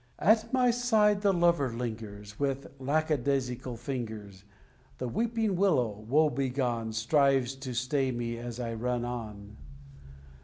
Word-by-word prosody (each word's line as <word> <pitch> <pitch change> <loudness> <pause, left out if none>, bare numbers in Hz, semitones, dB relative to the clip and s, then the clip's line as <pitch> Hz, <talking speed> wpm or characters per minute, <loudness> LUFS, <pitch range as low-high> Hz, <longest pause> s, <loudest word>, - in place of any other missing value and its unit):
At 220 +4 +3
my 250 -2 +4
side 220 -4 +3
the 200 -1 +4
lover 170 -7 +2
lingers, 110 -3 -6
And 105 - -21
with 135 -1 -2
lack 155 +4 0
a 150 - +4
daisical 125 -2 -2
fingers, 110 -7 -6 0.5
The 125 - -3
Weeping 225 - 0
Willow, 175 - +3 0.2
woe 155 +3 +4
begone, 125 -3 -1
Strives 135 +2 +2
to 130 -2 -6
stay 130 +2 0
me 120 -1 -3
as 120 0 -6
I 115 -2 -3
run 120 +1 -1
on." 105 -4 -7
130 Hz, 145 wpm, -29 LUFS, 115-155 Hz, 0.5 s, my